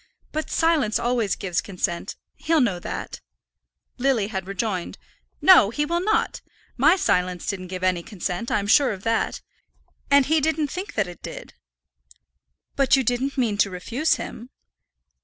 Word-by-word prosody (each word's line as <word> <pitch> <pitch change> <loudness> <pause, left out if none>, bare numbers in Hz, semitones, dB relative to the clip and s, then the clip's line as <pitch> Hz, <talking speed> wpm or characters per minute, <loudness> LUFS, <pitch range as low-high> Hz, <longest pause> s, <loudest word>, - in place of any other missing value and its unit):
"But 310 +1 -3
silence 310 -10 +2
always 235 -4 0
gives 185 -3 -2
consent. 180 -3 -3 0.2
He'll 325 -1 +1
know 205 -9 +1
that," - - -6 0.8
Lily 245 -6 +1
had 190 -4 -4
rejoined. 195 -2 -3 0.5
"No, 370 - +8
he 295 +6 -1
will 340 +3 -1
not; 430 +2 0 0.3
my 305 +8 +5
silence 180 - 0
didn't 185 -2 -4
give 185 0 -6
any 185 -2 +1
consent; 195 +2 -4
I'm 200 - 0
sure 255 +4 +4
of 195 -1 -10
that. 225 -1 -1 0.7
And 280 -1 +5
he 315 +2 +2
didn't 310 0 0
think 370 +3 -6
that 210 - +1
it 175 -1 -11
did." - - -9 1.2
"But 275 -1 +4
you 265 - +1
didn't 255 +4 -1
mean 220 -5 0
to 200 - +3
refuse 230 - 0
him?" 240 +3 -8
230 Hz, 155 wpm, -24 LUFS, 190-295 Hz, 1.2 s, No